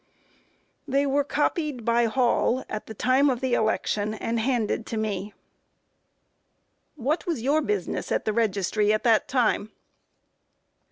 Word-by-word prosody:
A. - - -8
They 280 +1 +3
were 280 +1 +2
copied 295 -3 -1
by 235 0 +3
Hall 245 +2 +1
at 215 - -6
the 220 - -8
time 260 +6 +3
of 250 -3 0
the 260 -1 -1
election, 215 -1 0
and 230 +1 -2
handed 230 -2 -1
to 225 - -4
me. 205 -3 -2
Q. 210 - -13 1.7
What 300 +8 0
was 310 -10 -2
your 295 +4 +2
business 420 +5 -2
at - - 0
the 215 - 0
registry 210 -1 +1
at 215 - 0
that 225 -3 +3
time? 235 -4 +1
235 Hz, 150 wpm, -25 LUFS, 215-270 Hz, 1.7 s, They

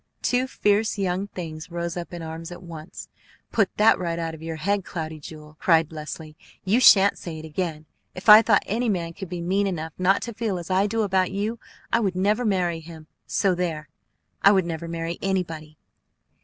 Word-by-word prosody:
Two 250 +1 +1
fierce 210 -2 +1
young 190 0 -1
things 160 -5 -7
rose 170 0 -3
up 175 -1 -6
in 170 -2 -6
arms 160 +1 -7
at 175 - -9
once. 165 -1 -9 0.4
"Put 210 -4 +2
that 215 +1 +5
right 170 -2 -2
out 165 -1 -3
of 160 - -10
your 165 0 -5
head, 195 +5 0
Cloudy 160 -3 -5
Jewel!" 150 0 -11
cried 165 -3 +3
Leslie. 155 0 -7 0.3
"You 210 +6 +3
shan't 200 -5 +6
say 165 -3 -6
it 155 - -8
again! 155 -1 -4 0.3
If 185 - -9
I 215 0 +11
thought 215 -3 +3
any 230 +4 -1
man 170 -4 -2
could 190 0 -8
be 175 -1 -4
mean 195 +4 +1
enough 160 -4 -4
not 190 +2 +3
to 235 - -5
feel 215 -3 -2
as 175 +1 -6
I 190 +2 +3
do 225 +1 0
about 190 -2 +1
you, 210 +4 -2 0.3
I 230 - +5
would 195 -5 0
never 210 +6 +1
marry 180 -5 +1
him; 160 -1 -11 0.2
so 195 -2 +2
there! 165 -5 -3 0.5
I 200 - +7
would 190 -3 +3
never 165 0 -4
marry 165 0 -4
anybody!" 165 -5 -3
180 Hz, 200 wpm, -24 LUFS, 165-200 Hz, 0.5 s, I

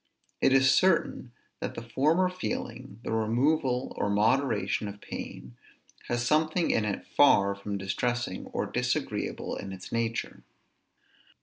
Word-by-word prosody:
It - - +4
is 135 0 +5
certain 170 -8 +2 0.3
that - - -4
the 115 - -6
former 150 +10 +2
feeling 125 - -5
(the - - -4
removal 125 +4 +1
or 100 - 0
moderation 110 +1 +1
of 100 0 -8
pain) 60 -10 -8 0.5
has 120 0 -1
something 155 +5 +2
in 110 - +1
it 100 -2 -3
far 100 -8 +4
from 100 0 -5
distressing, 110 +2 -2
or - - -2
disagreeable - - -2
in 95 - -6
its 95 -1 -9
nature. 115 -1 -2
120 Hz, 130 wpm, -28 LUFS, 105-135 Hz, 0.5 s, is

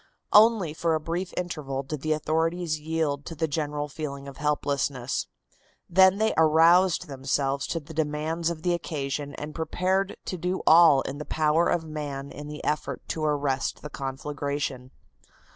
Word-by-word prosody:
Only 210 -7 +6
for 165 0 0
a - - 0
brief 170 +4 -3
interval 145 -6 -3
did 145 +1 -5
the 155 +1 +1
authorities 160 +1 0
yield 150 -2 -1
to 165 - -6
the 160 +1 0
general 150 0 -2
feeling 140 -2 -6
of 140 - -9
helplessness. 140 -3 -1 0.6
Then 190 +2 +5
they 220 +1 +2
aroused 165 +3 +5
themselves 135 -1 -1
to 165 - -2
the 160 +1 -12
demands 160 +2 -1
of 165 -2 -5
the 180 -1 +2
occasion 145 -4 -3
and 150 +1 -6
prepared 185 +4 -1
to 185 - -4
do 180 +3 -2
all 160 -4 +7
in 135 +2 -5
the - - -4
power 155 +2 +2
of 175 -2 +1
man 145 -3 -5
in 145 +2 -8
the 150 0 -8
effort 150 - -2
to 160 - -2
arrest 145 -3 -1
the 150 - -7
conflagration. 135 -1 -4
155 Hz, 160 wpm, -26 LUFS, 145-165 Hz, 0.6 s, all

